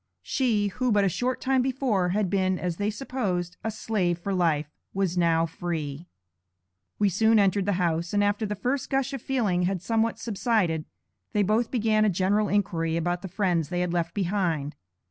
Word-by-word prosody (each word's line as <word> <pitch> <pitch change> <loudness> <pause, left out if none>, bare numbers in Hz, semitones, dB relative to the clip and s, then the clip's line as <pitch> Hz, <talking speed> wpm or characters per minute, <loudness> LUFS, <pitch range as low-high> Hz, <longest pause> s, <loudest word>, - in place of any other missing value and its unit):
She, 220 -7 +1
who 250 +5 -1
but 205 -1 +4
a - - +3
short 250 +8 -1
time 265 -1 +2
before, 250 -8 0
had 200 +2 +1
been, 185 0 +1
as 175 -2 -3
they 205 +1 0
supposed, 200 -7 -3
a 220 - -1
slave 210 -5 -1
for 195 +3 -3
life, 165 -5 +2 0.3
was 190 -3 0
now 165 -2 +3
free. 160 -2 -4 0.9
We 205 - +3
soon 220 +4 +3
entered 200 -1 +2
the 205 - +2
house, 170 -1 0
and 205 0 +2
after 205 +2 0
the 210 - -3
first 255 +7 -2
gush 270 0 0
of 270 - -4
feeling 220 -10 0
had 195 -2 -2
somewhat 225 +1 +1
subsided, 205 -8 0 0.5
they 205 - +3
both 220 +4 +1
began 220 -3 +2
a 215 - +4
general 195 +3 +1
inquiry 170 -5 0
about 175 +1 -1
the 195 - -5
friends 175 -5 0
they 175 0 -1
had 180 -1 -1
left 170 -1 -1
behind. 175 -7 -1
195 Hz, 185 wpm, -26 LUFS, 175-220 Hz, 0.9 s, but